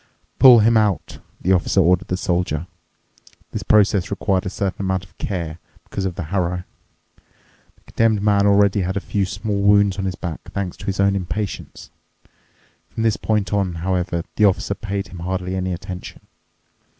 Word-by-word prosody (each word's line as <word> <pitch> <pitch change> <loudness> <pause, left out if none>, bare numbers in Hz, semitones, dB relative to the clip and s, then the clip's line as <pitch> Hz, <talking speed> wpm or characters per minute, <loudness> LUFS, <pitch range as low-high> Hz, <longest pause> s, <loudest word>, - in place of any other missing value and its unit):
"Pull 125 -4 +9
him 115 +1 +4
out," 105 -4 0 0.2
the 90 - +1
Officer 95 +2 +2
ordered 90 0 +3
the 90 - -1
Soldier. 90 -4 -1 0.9
This - - -4
process 100 -3 +3
required 95 -2 0
a - - -1
certain 100 +1 -3
amount 95 -1 -1
of 90 -1 -24
care 85 -4 -4 0.2
because 95 - -4
of 90 -2 -2
the - - -4
harrow. 90 -1 0 1.1
The - - -31
Condemned 110 -3 +1
Man 100 -1 +3
already 100 0 +4
had 95 +2 -2
a - - +1
few 100 0 -1
small 105 0 -3
wounds 100 -1 +4
on 95 - -2
his 95 -1 -2
back, 85 -4 -6
thanks 95 -3 -3
to - - -10
his 95 0 -2
own 100 0 +3
impatience. 95 +2 -5 1.0
From 115 - -4
this 110 -2 +3
point 105 -2 -1
on, 95 -4 0
however, 90 0 -1
the 105 - +5
Officer 100 0 +1
paid 100 -2 -4
him 90 -2 -10
hardly 90 +1 -3
any 95 0 -2
attention. 90 0 -7
95 Hz, 175 wpm, -21 LUFS, 90-100 Hz, 1.1 s, Pull